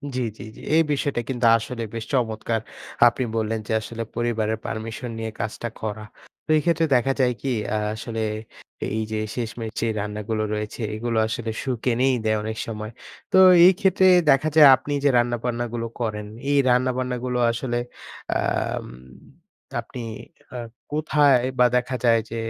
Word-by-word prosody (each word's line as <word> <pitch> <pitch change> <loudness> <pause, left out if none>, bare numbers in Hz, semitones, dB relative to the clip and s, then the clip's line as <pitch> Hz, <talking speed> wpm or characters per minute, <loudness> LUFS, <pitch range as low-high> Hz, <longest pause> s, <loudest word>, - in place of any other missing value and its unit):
জি, 130 - 0 0.2
জি, - - -9
জি। - - -13
এই 165 - +6
বিষয়টা 145 -2 0
কিন্তু 125 -2 -1
আসলে 115 +1 -5
বেশ 115 - -4
চমৎকার। 115 -2 0 0.5
আপনি 125 +2 0
বললেন 110 0 -1
যে - - -4
আসলে 115 +1 -5
পরিবারের 110 -2 0
পারমিশন 115 +2 -5
নিয়ে 110 0 -4
কাজটা 110 +3 -3
করা। 110 0 -4 0.4
তো - - -36
এই 155 - +2
ক্ষেত্রে 170 -1 +2
দেখা 135 +2 +2
যায় 125 -2 +3
কি? 135 - -4 0.3
আ - - +1 0.2
আসলে 115 0 -5 0.8
এইযে 110 0 -2 0.2
শেষমেশে 115 -1 -3
রান্নাগুলো 105 +1 -3
রয়েছে 105 +2 -4
এগুলো 115 +1 -2
আসলে 115 0 -3
সুখ 130 -4 -2
এনেই 130 +2 +2
দেয় 110 0 +2
অনেক 110 0 -4
সময়। 110 -1 -5 0.4
তো - - +4 0.3
এই 185 - +9
ক্ষেত্রে 190 -2 +3 0.2
দেখা 140 +3 +4
যায় 155 -2 +9
আপনি 130 +3 -5
যে 145 - +5
রান্নাবান্না 120 0 0
গুলো 115 -1 -2
করেন, 105 -3 -3 0.2
এই 145 - +3
রান্নাবান্না 125 0 +1
গুলো 125 -1 -1
আসলে 120 +1 -2 0.6
আম - - -1 0.9
আপনি 125 - -8 0.6
আ - - -3 0.3
কোথায় 150 -3 +3 0.2
বা 125 - +7
দেখা 125 +1 -2
যায় 115 -1 +5
যে 115 - -4
120 Hz, 155 wpm, -23 LUFS, 110-130 Hz, 0.9 s, এই